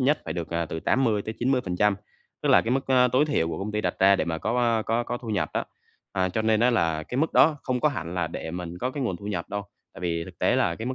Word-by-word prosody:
nhất 145 +4 +3
phải 80 - -3
được, 85 -2 -4
ờ, 85 -1 -1
từ 80 - -5
80-90%. 110 -3 +1 0.5
Tức - - 0
là - - +7
cái 115 - -2
mức, 135 +2 0
a, 125 -1 +4
tối 130 +5 +3
thiểu 115 - 0
của - - -4
công 105 +2 -4
ty 105 - 0
đặt 90 -3 -1
ra 100 +1 +6
để - - 0
mà 80 -1 -2
có 115 +2 +1
có 115 +2 +1
có 120 +1 -3
thu 120 - -9
nhập 105 -4 0
đó. - - 0 0.5
À, 95 -1 +1
cho 110 +4 -1
nên 110 0 +2
á 125 - +4
là 80 -9 +1
cái 125 - -6
mức 160 - +1
đó 155 -1 +5
không 125 -2 -1
có 150 - +4
hẳn 85 - -5
là 90 -2 0
để 80 - -6
mình 90 0 -6
có 125 +5 -1
cái 140 +1 -4
nguồn 95 -8 -1
thu 100 - -10
nhập 90 -5 -3
đâu, 100 0 -3 0.3
tại - - -11
vì 85 -2 -1
thực - - -13
tế - - +2
là 85 - +2
cái 115 +5 -6
mức 130 - -2
105 Hz, 290 wpm, -26 LUFS, 90-125 Hz, 0.5 s, là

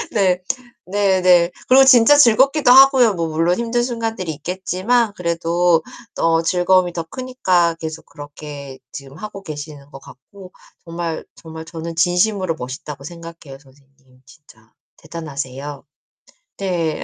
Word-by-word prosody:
네. 185 -4 +1 0.5
네 195 -1 +1
네. 180 -1 +4 0.2
그리고 265 +1 +7
진짜 260 +1 +6
즐겁기도 270 +2 +4
하고요. 260 -4 +6
뭐 170 -1 -2
물론 165 +3 0
힘든 235 +1 -1
순간들이 225 -7 -3
있겠지만 190 +8 -1
그래도 170 0 +1 0.3
또 165 0 +1
즐거움이 180 +1 +2
더 170 - -4
크니까 185 -6 0
계속 160 0 -7
그렇게 145 -2 -10
지금 135 0 -10
하고 210 -1 -8
계시는 145 -3 -9
것 135 - -11
같고 185 +9 -15 0.3
정말, 170 -1 -5
정말 160 0 -10
저는 165 0 -8
진심으로 180 +1 +1
멋있다고 135 +2 -8
생각해요 165 -3 -11
선생님 135 -1 -26
진짜. 115 -7 -21 0.3
대단하세요. 145 -3 -7 0.7
네. 175 -5 -2
170 Hz, 295 characters per minute, -19 LUFS, 150-195 Hz, 0.7 s, 그리고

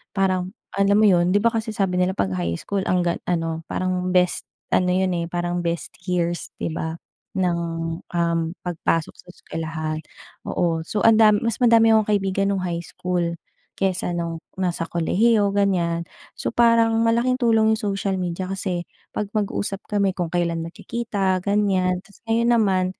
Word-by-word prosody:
parang, 185 -1 +1 0.2
alam 200 +1 +3
mo 215 - +5
'yon, 180 -2 +4
'di - - +5
ba, - - +5
kasi 225 -1 -2
sabi 195 -3 0
nila 180 +1 +2
'pag 95 -1 0
high 85 -2 -1
school 200 -1 -2
ang 180 -1 +2
ga 170 -1 +1
ano, 165 -2 -1
parang 185 0 -1
best, 180 -1 +2 0.2
ano 180 - +3
'yon, 185 0 +1
eh, 170 0 -2
parang 175 0 -2
best 170 -1 -3 0.2
years, 175 -1 -1
'di 165 - -3
ba, 160 0 -3 0.4
ng, 180 -2 +1 0.5
um, 170 -1 0 0.2
pagpasok 165 -2 -1
sa - - -19
eskuwelahan, 155 -2 -4 0.5
oo. 165 -2 0
So, 210 - -1
ang 225 -1 +6
da 215 -1 +7
mas 230 +3 -1
madami 230 -2 +6
akong 220 -1 +4
kaibigan 195 0 0
no'ng 190 - -2
high 170 -2 -2
school 175 -1 -2 0.4
kaysa 185 -2 -1
no'ng 170 -1 -3 0.2
nasa 180 -3 -1
kolehiyo, 205 +5 +2
ganiyan. 175 -4 +1 0.3
So - - -2
parang, 230 -1 +4
malaking 235 +2 +2
tulong 220 -3 +4
'yong - - -7
social 195 -1 -1
media 180 0 -3
kasi, 185 -2 -3 0.2
'pag 210 - -3
mag-usap 200 -1 -2
kami 200 -2 +1
kung 175 -3 -3
kailan 170 -2 0
magkikita, 195 +1 -2
ganiyan. 195 -3 +1
'Tas 195 +2 -20
ngayon 235 +1 +2
naman 190 -5 +2
185 Hz, 165 wpm, -23 LUFS, 175-205 Hz, 0.5 s, da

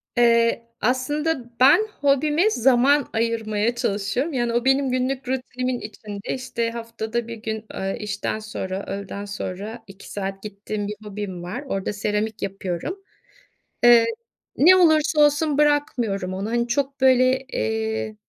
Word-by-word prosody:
Eee, 235 -1 +3
aslında 255 0 -1
ben 330 +12 +6
hobime 295 +7 +3
zaman 265 - +3
ayırmaya 225 0 0
çalışıyorum. 210 +9 -1
Yani, 240 -2 0
o 240 +1 0
benim 270 0 +3
günlük 255 +1 -1
rutinimin 255 -1 -2
içinde. 210 -1 -6
İşte, 235 -3 -3
haftada 230 0 -4
1 230 - -6
gün, 220 0 -5
eee, 195 0 -3
işten 210 0 -3
sonra, 195 -3 -5
öğleden 200 +1 -5
sonra 200 +3 -6
2 195 0 -13
saat 195 -1 -4
gittiğim 205 0 -5
bir 210 - -4
hobim 200 -4 -6
var, 200 +11 -5
orada 195 -5 -2
seramik 210 +1 -2
yapıyorum. 195 - -4 0.8
Eee, 240 -1 +8 0.5
ne 355 +6 +7
olursa 315 -3 +4
olsun 295 0 +3
bırakmıyorum 240 -11 +1
onu, 195 +3 -3
hani, 235 0 0
çok 275 +2 -1
böyle, 260 0 +5
eee, 110 0 -2
235 Hz, 135 wpm, -23 LUFS, 205-265 Hz, 0.8 s, Eee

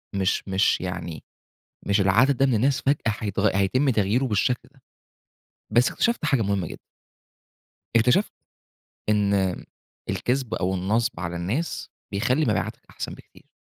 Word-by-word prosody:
مش 95 0 0
مش 95 +1 +2
يعني 85 -3 -5 0.6
مش 100 +1 +2
العدد 115 +9 +4
ده 135 - +3
من 130 - +2
الناس 135 +5 +2
فجأة 140 -3 +1
حيتغ 105 -2 0
هيتم 130 +9 +2
تغييرُه 110 +3 +1
بالشكل 125 +2 0
ده. 135 -3 -25 0.9
بس 120 +3 +4
اكتشفتت 235 -7 0
حاجة 135 -6 +2
مهمة 100 -3 0
جدًا. - - -9 1.2
اكتشفت 125 - +3 0.8
إن 105 -1 +2 0.8
الكذب 125 -2 -1
أو 95 +1 0
النصب 105 +5 0
على 85 -1 -3
الناس 110 - -3 0.2
بيخلّي 125 +9 +1
مبيعاتك - - -1
أحسن - - -6
بكتير. - - -18
110 Hz, 130 wpm, -25 LUFS, 95-130 Hz, 1.2 s, العدد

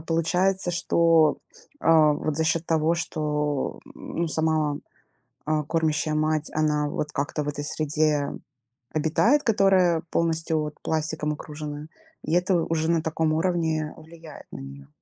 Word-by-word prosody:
получается, 175 +3 0
что, 165 -3 +3 0.4
а, 155 -2 +5
вот 150 0 -2
за 160 - +1
счет 165 +1 +1
того, 160 +1 +2
что, 150 -3 -2
м, - - -9
ну 165 - 0
сама, 155 -2 0 0.7
а, 155 0 0
кормящая 155 0 0
мать, 155 0 0
она 150 -1 +1
вот 150 +1 -3
как-то 145 +2 -2
в - - -6
этой 145 0 -4
среде 150 -1 0 0.6
обитает, 190 - +2
которая 190 -6 +3
полностью 160 -1 0
вот 150 0 -4
пластиком 155 -1 -1
окружена, 150 0 -7 0.4
и - - -4
это 180 +1 +2
уже 165 0 0
на 165 -2 +2
таком 160 0 0
уровне 160 -3 0
влияет 160 0 -13
на - - -6
нее. 70 +1 -10
155 Hz, 140 wpm, -25 LUFS, 150-165 Hz, 0.7 s, а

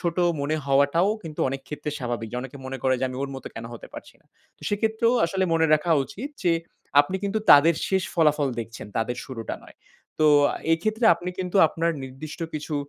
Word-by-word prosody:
ছোট 170 -1 -2 0.2
মনে 150 +2 0
হওয়াটাও 140 +7 +3
কিন্তু 155 -2 -7
অনেক 135 +1 -4
ক্ষেত্রে 150 0 -5
স্বাভাবিক। 120 -3 -4
যে 125 - -3
অনেকে 130 +2 -8
মনে 135 0 -5
করে 130 -1 +3
যে 130 - +1
আমি 130 - -7
ওর 140 - -3
মতো 135 - -7
কেনো 115 0 -7
হতে - - -10
পারছি - - -10
না? - - -33 0.3
তো - - -21
সেক্ষেত্রেও 220 +3 +1
আসলে 190 +2 0
মনে 160 0 +3
রাখা 155 +3 -1
উচিত 255 - -7
যে 175 - +3 0.5
আপনি 185 +7 -2
কিন্তু 200 +2 0
তাদের 155 +3 +8
শেষ 190 -1 +1
ফলাফল 150 -4 +3
দেখছেন, 115 -1 -8
তাদের 120 +2 -1
শুরুটা 115 -4 -6
নয়। - - -16 0.4
তো 155 - +4 0.5
এক্ষেত্রে 215 +7 0
আপনি 175 +2 -5
কিন্তু 185 +1 -2
আপনার 165 +1 0
নির্দিষ্ট 135 +5 -8
কিছু 150 0 -4
150 Hz, 195 wpm, -25 LUFS, 130-180 Hz, 0.5 s, তাদের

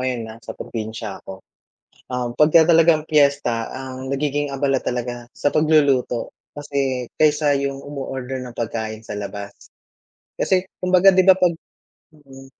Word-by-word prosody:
ngayon 125 -3 -2
nasa 115 +1 -10
probinsya 110 -2 -6
ako. 95 0 -11 0.6
Um, 125 -1 -3
pagka 160 +2 +6
talagang 165 -1 +5
piyesta 140 -7 +2
ang 130 0 -7
nagiging 145 +1 -1
abala 135 -1 0
talaga 120 -1 -4
sa 145 - 0
pagluluto 145 -6 +2 0.2
kasi 140 -4 -2
kaysa 150 -1 +3
yung 140 0 -3
umo-order 135 -2 -5
ng 125 -2 -9
pagkain 110 -1 -4
sa - - -9
labas. 100 0 -6 0.9
Kasi 190 0 +1
kumbaga, 185 +1 +5
'di 185 -1 +4
ba, 190 - +9
'pag 180 -3 +1 0.6
mm, 135 -3 -15
135 Hz, 135 wpm, -21 LUFS, 120-150 Hz, 0.9 s, ba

